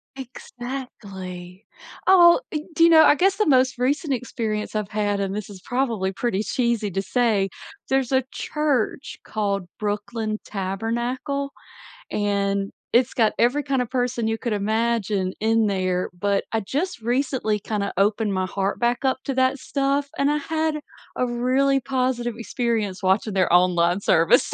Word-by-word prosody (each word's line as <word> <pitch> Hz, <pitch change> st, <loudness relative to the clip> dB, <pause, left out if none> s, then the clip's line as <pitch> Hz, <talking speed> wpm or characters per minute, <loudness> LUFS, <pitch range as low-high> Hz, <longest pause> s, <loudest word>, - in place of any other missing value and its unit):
Exactly. 205 Hz, -8 st, -8 dB, 0.4 s
Oh, 350 Hz, -1 st, +7 dB, 0.4 s
do 330 Hz, -, +4 dB
you 335 Hz, -, +7 dB
know, 320 Hz, -1 st, +8 dB
I 295 Hz, -, +6 dB
guess 385 Hz, +5 st, +2 dB
the 425 Hz, -, +1 dB
most 260 Hz, -3 st, +3 dB
recent 280 Hz, +3 st, 0 dB
experience 220 Hz, -4 st, -3 dB
I've 210 Hz, -2 st, -2 dB
had 205 Hz, -1 st, -1 dB
and 195 Hz, 0 st, -2 dB
this 210 Hz, -1 st, -5 dB
is 195 Hz, -2 st, -10 dB
probably 230 Hz, -7 st, -1 dB
pretty 210 Hz, 0 st, -1 dB
cheesy 235 Hz, -1 st, 0 dB
to 195 Hz, -, -1 dB
say, 205 Hz, -1 st, +1 dB, 0.4 s
there's 265 Hz, -1 st, +1 dB
a 260 Hz, -1 st, +3 dB
church 285 Hz, -4 st, -1 dB
called 200 Hz, -3 st, -2 dB
Brooklyn 215 Hz, +1 st, -3 dB
Tabernacle, 235 Hz, +8 st, -3 dB, 0.6 s
and 200 Hz, -1 st, 0 dB, 0.2 s
it's 245 Hz, +1 st, +3 dB
got 220 Hz, -3 st, +3 dB
every 260 Hz, +5 st, +3 dB
kind 270 Hz, -3 st, 0 dB
of 245 Hz, -, -3 dB
person 245 Hz, -3 st, -1 dB
you 225 Hz, 0 st, 0 dB
could 235 Hz, -2 st, -2 dB
imagine 210 Hz, -2 st, 0 dB
in 225 Hz, +1 st, +2 dB
there, 185 Hz, -2 st, 0 dB
but 200 Hz, +2 st, 0 dB
I 225 Hz, -, +1 dB
just 290 Hz, -, -3 dB
recently 245 Hz, -2 st, 0 dB
kinda 200 Hz, -1 st, -2 dB
opened 205 Hz, +1 st, +2 dB
my 185 Hz, 0 st, 0 dB
heart 195 Hz, +1 st, -2 dB
back 240 Hz, +2 st, 0 dB
up 260 Hz, -, +2 dB
to 275 Hz, -, -1 dB
that 260 Hz, +1 st, +2 dB
stuff, 280 Hz, +1 st, -1 dB
and 280 Hz, -, +2 dB
I 295 Hz, -, +2 dB
had 315 Hz, +1 st, -1 dB, 0.4 s
a 250 Hz, -, +1 dB
really 255 Hz, +3 st, +2 dB
positive 250 Hz, -2 st, -1 dB
experience 225 Hz, -5 st, -2 dB
watching 195 Hz, +2 st, +1 dB
their 185 Hz, -3 st, +2 dB
online 175 Hz, 0 st, +3 dB
service. 165 Hz, -3 st, +3 dB
230 Hz, 155 wpm, -23 LUFS, 200-260 Hz, 0.6 s, know